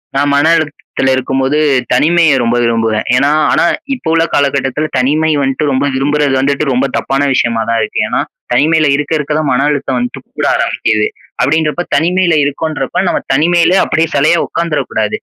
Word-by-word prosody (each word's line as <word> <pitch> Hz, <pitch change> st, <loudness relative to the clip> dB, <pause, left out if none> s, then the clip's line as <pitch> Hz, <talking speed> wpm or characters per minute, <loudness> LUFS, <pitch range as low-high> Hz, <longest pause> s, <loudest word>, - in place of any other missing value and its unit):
நான் 145 Hz, +1 st, +1 dB
மன 145 Hz, +2 st, +2 dB
அழுத்தத்துல 145 Hz, -4 st, -2 dB
இருக்கும் 135 Hz, +1 st, -2 dB
போது, 135 Hz, +3 st, 0 dB, 0.3 s
தனிமைய 165 Hz, +5 st, +3 dB
ரொம்ப 115 Hz, +1 st, 0 dB
விரும்புவேன். 115 Hz, -2 st, 0 dB
ஏன்னா 140 Hz, +3 st, +2 dB, 0.2 s
ஆனா -, -, +2 dB, 0.3 s
இப்ப 210 Hz, -10 st, -5 dB
உள்ள 165 Hz, 0 st, +3 dB
காலகட்டத்தில, 140 Hz, +1 st, 0 dB
தனிமை 150 Hz, +5 st, +1 dB
வன்ட்டு 135 Hz, +2 st, -1 dB
ரொம்ப 135 Hz, +1 st, 0 dB
விரும்புறது 145 Hz, +1 st, 0 dB
வந்துட்டு 140 Hz, +2 st, 0 dB
ரொம்ப 130 Hz, +2 st, +1 dB
தப்பான 135 Hz, +1 st, -1 dB
விஷயமா 115 Hz, -3 st, 0 dB
தான் 115 Hz, 0 st, +1 dB
இருக்கு. 110 Hz, -, -2 dB
ஏன்னா, -, -, -1 dB, 0.3 s
தனிமையில 155 Hz, +4 st, +3 dB
இருக்க, 150 Hz, +2 st, -2 dB
இருக்க 150 Hz, 0 st, -3 dB
தான் 155 Hz, -2 st, -1 dB
மன 135 Hz, +3 st, +1 dB
அழுத்தம் 135 Hz, -3 st, -2 dB
வந்துட்டு 125 Hz, 0 st, -5 dB, 0.2 s
கூட -, -, +1 dB
ஆரம்பிக்குது. 105 Hz, -1 st, 0 dB, 0.3 s
அப்படீன்றப்ப, 155 Hz, +5 st, 0 dB
தனிமையில 175 Hz, +3 st, +1 dB
இருக்கோன்றப்ப 145 Hz, +2 st, -2 dB
நம்ம -, -, -1 dB
தனிமையில 170 Hz, +5 st, +2 dB
அப்படியே 160 Hz, 0 st, 0 dB
செலையா 155 Hz, +4 st, +3 dB
உட்காந்துற 170 Hz, -3 st, -2 dB
கூடாது. 105 Hz, -1 st, -1 dB
145 Hz, 165 wpm, -13 LUFS, 130-155 Hz, 0.3 s, தனிமைய